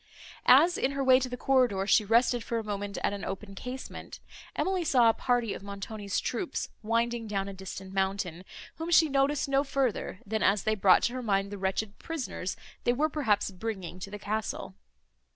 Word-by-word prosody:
As, 325 +7 +6
in 270 - +1
her 275 0 -1
way 260 -1 +6
to 255 -1 -3
the 250 - -5
corridor, 245 -8 +2
she 215 - +4
rested 235 +2 +3
for 235 - -2
a 225 - -2
moment 205 -1 -4
at - - +1
an 200 - -5
open 195 +1 -5
casement, 250 +6 -7 0.4
Emily 375 -2 0
saw 250 -7 +5
a - - +4
party 240 -4 0
of - - -7
Montoni's 200 0 -4
troops 250 +3 -3
winding 230 +1 0
down 195 -2 -2
a 200 - -6
distant 190 0 -8
mountain, 190 -3 -1 0.3
whom 325 +1 -4
she 325 -2 +6
noticed 275 +1 +1
no 275 0 +2
further 265 -9 -1
than 220 +1 -2
as 200 +1 +3
they 220 - +2
brought 195 -3 +5
to 240 - +1
her 255 - -3
mind 200 -3 0
the 205 - -5
wretched 200 +2 -2
prisoners 280 - -4 0.3
they 240 - +3
were, 300 +5 +1
perhaps, 215 -10 +1
bringing 190 -3 -5
to 190 - -6
the 210 - -6
castle. 210 -1 -3
220 Hz, 195 wpm, -29 LUFS, 200-260 Hz, 0.4 s, As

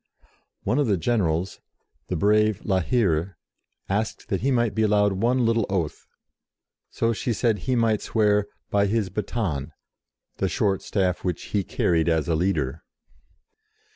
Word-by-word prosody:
One 125 - +1
of 145 - +2
the 100 -3 +2
generals, 90 -3 0 0.5
the 90 - -2
brave 105 +3 +2
La 95 -2 +2
Hire, 95 -4 0 0.5
asked 105 +3 -2
that 95 - -1
he 135 - +1
might 120 -4 +2
be 110 - 0
allowed 105 -2 +3
one 120 +5 +1
little 115 -2 +2
oath, 90 -6 -2 0.8
so 115 0 0
she 115 +2 -2
said 110 -1 +1
he 130 -1 -1
might 115 -3 +2
swear 105 -2 +2 0.2
"by 100 0 +3
his 105 -2 0
baton," 90 - -3 0.6
the - - 0
short 95 -2 0
staff 95 -3 -1
which 90 -3 -2
he 100 -2 +2
carried 85 -1 +1
as 80 0 +1
a 85 - +1
leader. 80 -4 0
100 Hz, 150 wpm, -24 LUFS, 90-115 Hz, 0.8 s, allowed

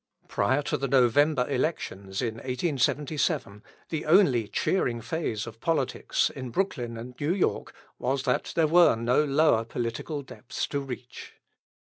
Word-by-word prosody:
Prior 130 +8 +1
to 150 - -1
the 135 0 -2
November 130 +1 +3
Elections 110 - -2
in 115 -2 -2
1877, 135 - -1 0.3
the 160 - -3
only 150 - +4
cheering 120 - 0
phase 115 -3 -3
of 115 -1 -10
politics 160 -6 0
in 130 -1 -7
Brooklyn 120 -6 -2
and 120 +2 -8
New 155 +5 0
York 195 - -1 0.3
was 130 +1 -1
that - - 0
there 165 - +4
were 170 -1 +5
no 120 +6 +2
lower 145 -5 +3
political 120 +6 -4
depths - - -5
to 140 - -1
reach. 125 -2 -8
130 Hz, 140 wpm, -27 LUFS, 115-150 Hz, 0.3 s, were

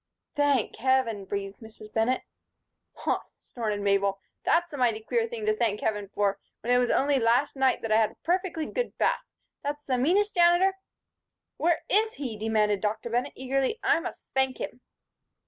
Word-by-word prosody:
"Thank 285 -5 +1
Heaven!" 240 -5 +1
breathed 195 0 -4
Mrs. 215 -1 -13
Bennett. 230 +3 +1 0.7
"Huh!" - - 0 0.2
snorted 215 -4 -4
Mabel, 200 -1 +2 0.2
"that's 345 -1 +2
a - - -4
mighty 235 -4 +2
queer 455 - 0
thing 455 -2 -5
to 430 0 +2
thank 215 - 0
Heaven 210 -3 -1
for, 200 -1 +1 0.2
when 245 +2 +1
it 245 - +5
was 245 -1 +1
only 275 0 +3
last 245 +5 +2
night 265 -1 +2
that 225 - -2
I 215 - +5
had 220 -1 +3
a - - -19
perfectly 350 -2 0
good - - -3
bath. - - +2 0.4
That's 290 0 -4
the 255 -2 0
meanest 395 +10 +2
Janitor 350 +2 +4 0.4
" - - -60
"Where 335 0 +1
is 435 +2 +2
he?" 255 -6 -4
demanded 210 -2 +1
Dr. 220 +2 -2
Bennett, 245 +2 0
eagerly. 270 - -1
"I - - +4
must - - -7
thank 265 -1 +1
him." 250 - -6
255 Hz, 180 wpm, -27 LUFS, 215-320 Hz, 0.7 s, it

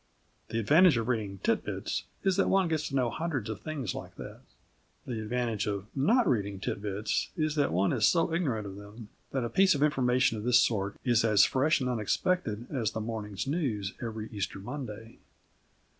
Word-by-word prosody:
The 115 - -3
advantage 155 - +5
of 115 0 -1
reading 105 -6 -1
Tit - - +1
Bits - - -3 0.2
is 190 -1 +2
that 200 - +2
one 195 -2 +3
gets 160 -2 -1
to 135 - -5
know 125 -3 +1
hundreds 145 -10 -3
of 110 - -7
things 145 - -4
like - - -8
that. - - -9 0.7
The 115 -3 -4
advantage 115 -1 -1
of 100 -1 -2
not 225 - +3
reading 100 -5 0
Tit 100 - -3
Bits 105 +1 -1
is 155 -1 0
that 145 -2 +1
one 95 +3 +2
is - - +3
so 165 -1 +2
ignorant 130 - 0
of 100 -1 -7
them 105 +2 -11 0.2
that 135 -2 -2
a - - 0
piece 190 - +4
of 140 - +1
information 125 -5 +2
of - - -7
this 125 +1 +5
sort 100 -3 0
is 120 -3 +3
as 105 -3 +5
fresh 145 +3 +2
and 130 - 0
unexpected 120 - 0
as 120 -7 -1
the - - -3
morning's 105 -3 -4
news 130 - -2
every 110 -2 -4
Easter 100 -2 -3
Monday. 115 0 -7
120 Hz, 195 wpm, -29 LUFS, 105-145 Hz, 0.7 s, advantage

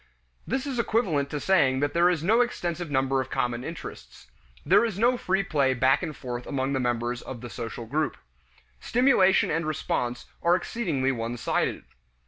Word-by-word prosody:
This 265 +1 -1
is 265 -4 -3
equivalent 185 -12 +1
to 150 - -3
saying 140 -8 +3
that 145 - 0
there 170 +1 +4
is 170 -4 -1
no 220 +7 +4
extensive 175 -8 -2
number 135 -1 +1
of 130 - -7
common 120 0 -1
interests; 160 - -9 0.3
there - - +5
is 225 -5 -2
no 240 +4 +3
free 190 -4 0
play 140 -7 +1
back 130 +2 +3
and 160 -5 -5
forth 125 -1 -6
among 135 0 -1
the 135 - 0
members 120 -1 -1
of 125 -3 -8
the 120 -2 -8
social 115 0 -6
group. 150 +5 -1 0.6
Stimulation 230 -7 +3
and 165 +2 0
response 125 -5 -2 0.2
are 170 +1 +4
exceedingly 165 - -1
one 120 -1 -3
sided. - - -1
145 Hz, 175 wpm, -26 LUFS, 130-185 Hz, 0.6 s, there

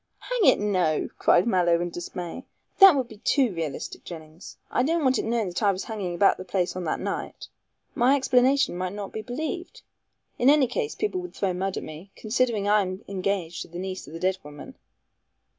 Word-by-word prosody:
"Hang - - -1
it, - - +6
no!" 185 -7 +1
cried 175 - +4
Mallow 175 -6 +3
in 175 0 -3
dismay, 175 +6 -6 0.4
"that 390 -5 +10
would 260 -3 -1
be 220 - -13
too 255 -2 +2
realistic, 165 -4 -5
Jennings. 160 0 -10
I - - +2
don't 325 +4 +1
want 260 -1 +3
it - - -2
known 225 -3 0
that 175 - -4
I 205 -2 +4
was 190 0 -4
hanging 200 -6 -4
about 195 +3 +4
the - - -7
place 185 -1 -1
on 185 -1 -4
that 155 - -1
night. - - -5 0.4
My 255 +4 +4
explanation 265 -2 +3
might 185 +1 -3
not 205 -1 -6
be 220 - -4
believed. 315 - -5 0.6
In 250 - +5
any 290 -2 +5
case, 440 - -3
people 400 -3 -2
would 360 - -9
throw 190 -2 -1
mud 190 +1 -2
at - - -4
me, 155 +5 -10
considering 220 -2 0
I 210 0 +4
am 185 +1 -5
engaged 185 -3 -2
to - - -6
the 175 - -9
niece 190 +1 -5
of 150 - -11
the 165 - -6
dead 185 +1 0
woman." 150 0 -11
200 Hz, 210 wpm, -26 LUFS, 180-255 Hz, 0.6 s, that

